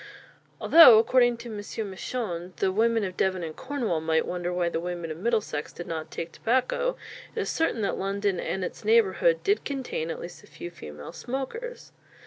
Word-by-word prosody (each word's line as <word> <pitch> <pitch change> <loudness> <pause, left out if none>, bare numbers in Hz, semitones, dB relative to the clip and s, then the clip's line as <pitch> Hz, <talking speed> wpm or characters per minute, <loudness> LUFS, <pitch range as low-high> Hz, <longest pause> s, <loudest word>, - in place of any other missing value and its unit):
Although, 320 -9 +9
according 240 +1 +4
to 235 0 -9
M. 215 - -6 0.3
Misson, 185 -4 -4
the 190 +5 +1
women 225 +2 +2
of 185 -2 -4
Devon 185 -1 0
and 160 -1 -5
Cornwall 245 - -2
might 160 0 +1
wonder 175 0 -3
why 180 -1 0
the 170 - -1
women 175 -1 -4
of 155 - -6
Middlesex 210 -8 -1
did 175 - -8
not 160 -1 -5
take 165 0 -5
tobacco, 260 - 0 0.4
it - - -2
is - - -2
certain 325 -8 0
that 200 - -1
London 195 -1 -1
and 190 - -2
its - - -7
neighbourhood 465 +2 +3
did 405 +1 +2
contain 260 - -3
at 165 - -4
least 175 - -9
a - - -16
few 175 - -8
female 75 - -10
smokers. 360 - -6
200 Hz, 185 wpm, -27 LUFS, 175-255 Hz, 0.4 s, Although